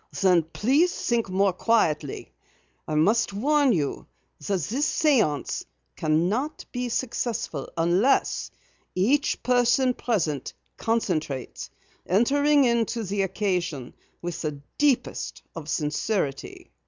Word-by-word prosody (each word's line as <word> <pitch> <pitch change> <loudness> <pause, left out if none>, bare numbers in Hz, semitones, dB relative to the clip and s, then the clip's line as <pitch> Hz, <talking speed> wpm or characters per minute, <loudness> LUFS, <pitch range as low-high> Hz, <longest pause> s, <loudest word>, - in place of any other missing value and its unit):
"Then 185 -3 +5
please 260 - +2
think 235 -4 -1
more 190 0 +2
quietly. 155 - 0 0.5
I 155 - -2
must 205 +8 +2
warn 285 +5 +3
you 150 -9 -1 0.3
that 185 +4 -1
this 250 - 0
séance 220 - +2 0.3
cannot 180 - 0
be 245 -1 -3
successful 230 - -3
unless 175 +10 +2 0.5
each 255 +11 +1
person 250 +1 +3
present 165 - -2 0.2
concentrates, 155 - -2 0.4
entering 285 +8 +3
into 235 -1 +1
the 200 0 -1
occasion 180 - -2 0.3
with 175 -1 -4
the 150 -3 -3 0.2
deepest 285 -4 0
of 160 -2 -7
sincerity." 150 -1 -2
200 Hz, 105 wpm, -25 LUFS, 160-245 Hz, 0.5 s, Then